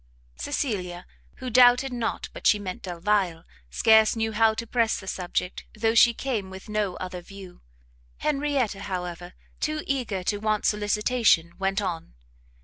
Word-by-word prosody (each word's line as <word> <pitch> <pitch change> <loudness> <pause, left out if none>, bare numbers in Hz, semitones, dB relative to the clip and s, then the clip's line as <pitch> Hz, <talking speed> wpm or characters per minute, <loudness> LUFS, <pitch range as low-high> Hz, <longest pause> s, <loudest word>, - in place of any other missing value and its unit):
Cecilia, 180 - -3 0.3
who 255 -1 -6
doubted 250 +2 +5
not 235 -2 -3
but - - -2
she 210 - +5
meant 190 -3 -6
Delvile, 180 -1 -1 0.3
scarce 220 - +5
knew 225 0 -1
how 220 0 +3
to 230 - -4
press 230 -1 +1
the 190 - -11
subject, 180 -1 -3
though 225 +1 +2
she 235 +1 +7
came 230 -5 -3
with 190 +3 -11
no 210 -3 -1
other 180 -1 -6
view: 190 0 -12 0.6
Henrietta, 280 -8 0
however, 180 -2 -5 0.2
too 305 0 -2
eager 240 -9 -2
to 205 +3 0
want 215 0 -1
solicitation, 210 -4 +2
went 195 +1 0
on. 165 - -5
210 Hz, 145 wpm, -26 LUFS, 185-230 Hz, 0.6 s, she